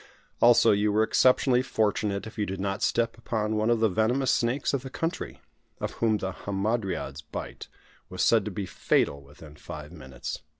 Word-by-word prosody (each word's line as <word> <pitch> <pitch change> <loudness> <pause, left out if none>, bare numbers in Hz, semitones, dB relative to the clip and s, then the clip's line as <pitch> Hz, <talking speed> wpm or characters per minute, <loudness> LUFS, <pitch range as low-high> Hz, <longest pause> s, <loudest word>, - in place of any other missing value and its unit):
Also, 120 -1 +6
you 105 +1 +2
were 110 +1 +3
exceptionally 125 +2 +3
fortunate 105 -4 -1
if 110 - -10
you 105 - -1
did 95 0 -4
not 100 +1 -2
step 115 0 0
upon 110 -2 -2
one 110 +1 +1
of 120 -1 +3
the 110 - +5
venomous 110 +6 +1
snakes 120 +5 0
of 140 - 0
the 135 - -8
country, 165 +6 -4 0.4
of - - -3
whom 110 -2 +1
the 95 -2 -3
hamadryad's 100 +2 -3
bite - - -8 0.4
was 90 0 -2
said 115 -3 +4
to 105 - -4
be 100 0 -4
fatal 70 -5 0
within 75 +2 -14
five 75 0 -9
minutes. 65 -7 -7
105 Hz, 180 wpm, -27 LUFS, 95-115 Hz, 0.4 s, Also